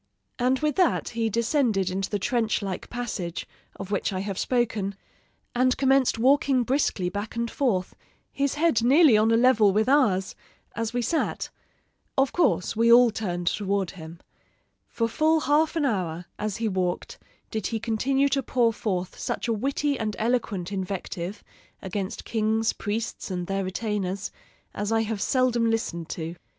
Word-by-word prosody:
"And 255 +2 +2
with 305 +2 0
that 365 -3 +2
he 230 -1 -1
descended 225 - +1
into 190 +1 -2
the 205 - -1
trench 225 0 0
like 190 -2 -5
passage, 220 -8 -4 0.3
of 195 0 -8
which 200 - 0
I 185 -1 -2
have 195 -1 -4
spoken, 225 -6 0 0.6
and 255 +1 +2
commenced 270 -2 +3
walking 265 +1 +3
briskly 240 -7 0
back 205 +5 -4
and 235 0 -2
forth, 210 -10 0 0.4
his 280 0 -1
head 315 -6 +2
nearly 275 +2 +6
on 215 +1 +4
a 225 - +4
level 230 -4 +5
with 215 +3 +1
ours, 215 -10 +3 0.4
as 230 -1 -2
we 245 0 -1
sat. 320 +6 -1 0.7
Of 270 0 +2
course 335 - +1
we 230 +1 +4
all 240 0 +7
turned 175 -5 -3
toward 195 0 0
him. 165 -2 -10 0.7
For 230 - -1
full 315 +6 +2
half 305 +3 +2
an 315 -3 +1
hour, 180 -8 -2
as 210 -2 -2
he 230 - -1
walked, 185 -3 -2 0.3
did 220 - -2
he 225 - -2
continue 265 +5 +1
to 275 0 +1
pour 240 -2 +1
forth 185 -5 -3
such - - -3
a 230 - +1
witty 275 +5 -1
and 215 -2 -2
eloquent 215 -6 -1
invective 190 0 -4 0.4
against 195 +2 -4
kings, 220 0 +1
priests, 220 +1 -4
and 180 -2 -3
their 195 +1 -1
retainers, 195 0 -3 0.4
as 205 +1 -3
I 225 0 +3
have 220 -2 -3
seldom 240 -2 +2
listened 170 -7 -2
to. 165 +1 -5
225 Hz, 160 wpm, -26 LUFS, 195-250 Hz, 0.7 s, all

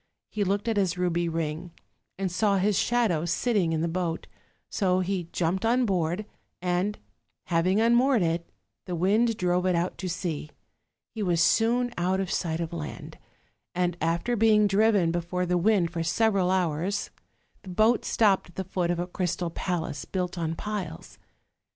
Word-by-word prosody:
He 210 - 0
looked 200 +3 -1
at 225 -2 0
his 185 -3 +1
ruby 175 -1 0
ring, 165 +1 -3 0.4
and 190 -1 -2
saw 200 +2 +2
his 200 +2 +2
shadow 220 -8 +1
sitting 180 +1 +1
in 160 -1 0
the 170 - 0
boat; 170 -1 -2 0.4
so 185 -2 +1
he 180 -2 -2
jumped 180 +4 -1
on 245 +2 +3
board; 180 0 -1 0.3
and 180 +3 -1 0.5
having 180 +4 +1
unmoored 235 0 +4
it, 170 0 -1 0.4
the 180 - -2
wind 210 +6 +2
drove 180 0 +1
it 180 - +2
out 170 +2 -1
to 185 - -3
sea: 165 -4 -3 0.6
he 220 - -5
was 175 -4 +1
soon 240 +7 +3
out 185 +2 +1
of 195 -1 -2
sight 165 -2 -1
of 165 0 -4
land, 155 -3 -7 0.6
and 180 -1 0
after 170 +9 0
being 215 -1 +4
driven 200 -3 +3
before 175 +1 -2
the 180 0 0
wind 180 -2 +2
for 170 -1 -3
several 190 +2 +2
hours, 185 +2 0 0.5
the 190 - -11
boat 215 +6 +3
stopped 200 -5 +2
at 175 - -18
the 190 - -3
foot 180 -2 -2
of 175 - 0
a 175 - -1
crystal 175 -1 -2
castle, 165 -5 -3
built 180 -1 -2
on 165 -2 -2
piles. 205 - -6
180 Hz, 170 wpm, -27 LUFS, 170-205 Hz, 0.6 s, unmoored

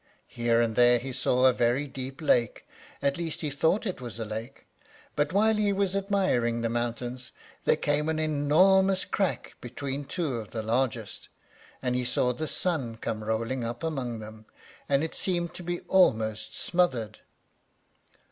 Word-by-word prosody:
Here 120 -1 +2
and 115 -2 +1
there 120 0 +6
he 130 +2 -5
saw 125 +1 +2
a 130 - +6
very 120 +4 +1
deep 135 +2 -7
lake, 120 -6 +1 0.4
at 140 0 +1
least 165 -2 -3
he 150 -3 -2
thought 160 +10 +1
it 185 -9 -3
was 120 -3 -7
a 115 - -3
lake; 110 +5 -7 0.5
but 145 0 +1
while 215 +3 +4
he 210 -1 +2
was 195 -1 0
admiring 190 - +1
the 115 - 0
mountains, 120 +1 -3 0.3
there - - +5
came 150 +1 0
an 160 - 0
enormous 180 +6 +3
crack 195 -3 -1
between 135 +3 -5
two 145 -4 -2
of 110 -2 -7
the 110 -2 -4
largest, 115 -1 -2 0.5
and 125 -1 0
he 125 - 0
saw 125 0 +1
the 155 +6 -4
sun 140 -13 -2
come 110 -1 -4
rolling 115 +3 -1
up 120 +3 -5
among 135 -8 -2
them, 110 0 -10 0.4
and 140 +1 +3
it 160 - -3
seemed 175 -2 -1
to - - -9
be 175 0 -3
almost 110 - +2
smothered. 130 -12 0
130 Hz, 165 wpm, -28 LUFS, 115-165 Hz, 0.5 s, there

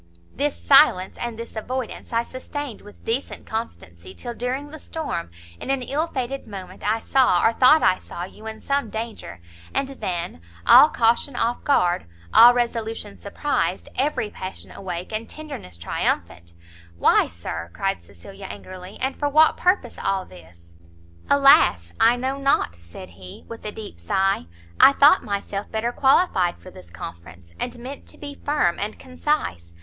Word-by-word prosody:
"This 290 +1 -2
silence 270 -10 +5
and 240 -2 -4
this 230 0 -8
avoidance 250 +2 -5
I 230 0 +1
sustained 260 0 -6
with 205 - -16
decent 240 +5 -3
constancy, 95 - -7
till 240 - -6
during 255 +5 -3
the 315 - -9
storm, 235 - -4 0.3
in - - -7
an 270 -2 0
ill 300 +6 -1
fated 265 -3 -4
moment, 190 -3 -9
I 225 - 0
saw, 250 -8 +3
or 225 - +4
thought 265 +6 +6
I 185 - +4
saw 175 - -7
you 215 +4 -10
in 220 0 -7
some 280 -4 -1
danger, 220 - -6 0.4
and 275 - +1
then, 175 - -4 0.2
all 300 - +9
caution 235 +3 +1
off 235 +1 -1
guard, 180 - +2 0.3
all 240 +1 +10
resolution 225 -3 -2
surprised, 195 - -2
every 260 -6 0
passion 185 0 -8
awake, 180 -1 -6
and 220 +1 -4
tenderness 290 - -8
triumphant 85 0 -2 0.2
" 85 0 -23
"Why, - - +4
Sir," 85 0 -6
cried 195 - -2
Cecilia, 195 0 -12
angrily, 185 +1 -9
"and 265 +1 -1
for 290 - -1
what 310 +2 +5
purpose 365 +2 0
all 195 -1 0
this?" 85 -1 -17 0.5
"Alas, 90 - +5
I 230 +2 +6
know 260 +3 -2
not!" 275 - +2
said 85 0 -12
he, 90 +1 -12
with 230 - -9
a 210 - -3
deep 210 - -9
sigh, 190 - 0 0.3
"I 275 - +8
thought 290 +6 +6
myself 200 -1 -4
better 225 +2 -1
qualified 255 - +3
for 185 - -13
this 90 - -14
conference, 85 0 -10
and 240 - -3
meant 260 +4 -9
to - - -10
be 285 -1 -9
firm 285 - +1
and 210 +2 -3
concise. 255 - -3
220 Hz, 165 wpm, -23 LUFS, 175-265 Hz, 0.5 s, all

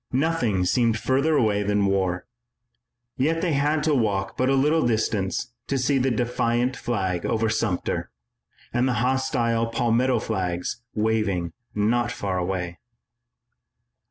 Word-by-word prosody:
Nothing 130 - +1
seemed 115 +3 +2
further 140 +7 +1
away 105 -5 +2
than 100 0 +1
war, 95 -2 0 0.9
yet 160 +5 +1
they 170 -4 +1
had 150 +2 +1
to 155 0 +2
walk 100 -6 0
but 130 +1 +1
a 135 - +3
little 150 +4 +3
distance 110 -1 -1
to 140 - 0
see 135 +2 +2
the 130 +1 +2
defiant 120 +1 0
flag 95 -7 -2
over 110 0 0
Sumter, 105 -5 -1 0.6
and 120 +2 +2
the 130 - +1
hostile 120 -3 +1
Palmetto 120 +2 +1
flags 95 -2 -2
waving 105 -6 0 0.2
not 120 +3 +1
far 95 -6 -2
away. 90 -1 -3
115 Hz, 130 wpm, -24 LUFS, 100-130 Hz, 0.9 s, a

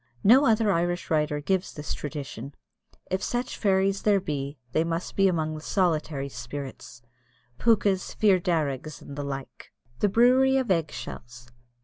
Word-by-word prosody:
No 260 +7 +6
other 220 -2 +3
Irish 175 0 -1
writer 150 -1 +1
gives 190 +4 -1
this 150 0 -4
tradition 140 -3 -6 0.6
if 190 +1 0
such 245 +3 -2
fairies 195 -1 +1
there 205 -2 +3
be, 140 -4 -4
they 160 - +2
must 165 +1 -3
be 195 -1 +4
among 160 -4 0
the 155 - -7
solitary 155 -6 0
spirits 125 -1 -8 0.6
Pookas, 200 -5 +2
Fir 200 -4 +4
Darrigs, 155 -5 -2
and 140 - -9
the 145 - -4
like. 135 -1 -7 0.3
THE 205 - +3
BREWERY 255 +5 +4
OF 260 -6 0
EGG 165 -4 +1
SHELLS. 120 +1 -9
165 Hz, 150 wpm, -26 LUFS, 145-195 Hz, 0.6 s, No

